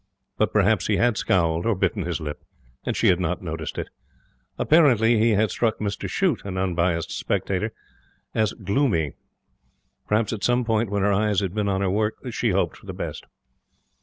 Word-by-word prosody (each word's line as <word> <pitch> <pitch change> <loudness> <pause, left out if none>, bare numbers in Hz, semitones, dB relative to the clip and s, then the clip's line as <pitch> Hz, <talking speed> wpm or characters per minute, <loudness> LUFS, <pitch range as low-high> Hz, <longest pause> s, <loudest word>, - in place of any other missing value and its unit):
But 110 - +1
perhaps 105 -1 +2
he 105 - +2
had 120 -1 +3
scowled 85 -4 +1
(or 115 - +2
bitten 95 0 0
his 85 -3 -2
lip), 75 -2 -6 0.5
and - - -1
she - - +4
had 90 -1 +3
not 90 +1 -2
noticed 80 -2 -5
it. - - -4 0.7
Apparently 120 -8 +4
he 110 0 +4
had 105 +1 +2
struck 115 -2 0
Mr 100 -1 -3
Shute, 180 - 0
an 95 -2 -5
unbiased 85 -2 0
spectator, - - -1 0.6
as 110 -2 +1
gloomy. 100 - 0 0.9
Perhaps 105 +1 +1
at 105 - -5
some 120 0 +2
moment 110 -1 +1
when 100 -1 0
her 100 0 +3
eyes 105 0 +2
had 95 -3 -2
been 105 -1 0
on 95 0 0
her 95 -2 +1
work 105 +2 0 0.2
She - - 0
hoped - - 0
for - - -17
the - - -5
best. - - -6
100 Hz, 185 wpm, -24 LUFS, 90-110 Hz, 0.9 s, she